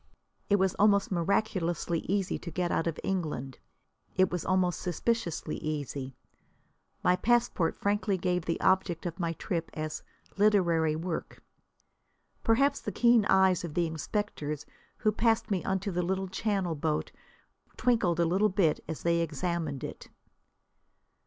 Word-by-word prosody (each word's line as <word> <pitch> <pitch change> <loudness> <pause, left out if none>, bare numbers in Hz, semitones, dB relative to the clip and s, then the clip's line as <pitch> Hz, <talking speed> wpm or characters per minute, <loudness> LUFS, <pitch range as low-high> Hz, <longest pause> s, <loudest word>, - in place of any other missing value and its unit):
It 205 - +5
was 190 -2 +2
almost 200 -1 +4
miraculously 175 -2 0
easy 195 -1 0
to 170 - -7
get 175 0 -1
out 165 - 0
of 165 - -2
England. 150 -9 -3 0.6
It 185 0 +3
was 180 -2 -2
almost 185 -2 +1
suspiciously 180 -3 -1
easy. 140 -3 -4 0.9
My 180 - +4
passport 230 -4 +2
frankly 205 -1 0
gave 180 -1 -1
the 165 - -1
object 190 -2 +2
of 175 +2 -4
my 170 -2 -1
trip 170 -1 -3
as 155 0 -4 0.4
"literary 170 -7 +3
work." 165 +1 -5 1.0
Perhaps 275 +5 +3
the - - -4
keen 235 -3 +4
eyes 190 -3 +4
of 165 -3 -6
the 175 - +2
inspectors 155 -2 -3 0.3
who 215 - +2
passed 225 0 +1
me 190 -3 0
onto 190 +1 -1
the 180 0 0
little 190 +2 -1
channel 195 -3 -1
boat 155 0 -1 0.7
twinkled 225 -9 +2
a 185 +5 +3
bit 180 -5 +1
as 160 -1 -5
they 170 0 +2
examined 165 -2 -2
it. - - -7
180 Hz, 140 wpm, -29 LUFS, 165-200 Hz, 1.0 s, It